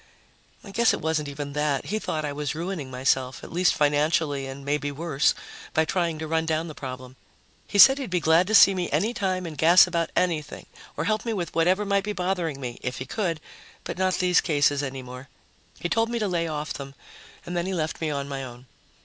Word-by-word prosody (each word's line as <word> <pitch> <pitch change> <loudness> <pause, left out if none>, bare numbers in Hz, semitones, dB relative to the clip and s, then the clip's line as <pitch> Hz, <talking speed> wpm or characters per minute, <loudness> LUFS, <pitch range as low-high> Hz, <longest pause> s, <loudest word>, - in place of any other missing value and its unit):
I 200 - -10
guess 235 +3 +3
it - - -7
wasn't 155 -1 -1
even 140 0 -6
that 150 -2 0
he 215 +2 -2
thought 155 -6 -3
I 145 - -3
was 145 -1 -3
ruining 165 -4 -4
myself, 130 0 0
at - - -10
least 180 +1 +3
financially 145 -1 +1
and 135 +1 -8
maybe 145 0 -1
worse, 150 -1 +1 0.4
by 160 - +3
trying 170 -1 -1
to 160 0 -5
run 160 0 0
down 160 +1 0
the 155 - -7
problem. 130 -2 -8 0.5
He 205 - -2
said 270 +7 +9
he'd 265 - -4
be 180 -1 +1
glad 165 +3 +3
to 220 - +2
see 195 -1 +8
me 180 -2 -2
any 225 +4 0
time 185 -5 -1
and 160 -2 -6
gas 170 +4 +7
about 170 -2 -1
anything 160 -5 -1 0.3
or - - -1
help 215 0 0
me 230 - -2
with 180 -5 -4
whatever 185 +5 +2
might 200 -1 +1
be 210 +1 -3
bothering 180 -6 -2
me, 125 -3 -6
if 125 -1 -4
he 130 - -5
could, 170 - -2 0.4
but - - -6
not 185 -1 +2
these 180 -1 +3
cases 145 -3 +2
any 135 -2 -5
more. 125 +2 -10 0.5
He - - -2
told 225 +5 +1
me 235 - -2
to 215 -2 0
lay 170 -3 -1
off 150 -1 -4
them, 140 0 -8 0.5
and 175 +1 -5
then 175 +1 -1
he 190 - -2
left 160 -1 -3
me 160 - 0
on 140 -1 -3
my 135 -1 -4
own. 125 0 -10
160 Hz, 225 wpm, -25 LUFS, 140-185 Hz, 0.5 s, said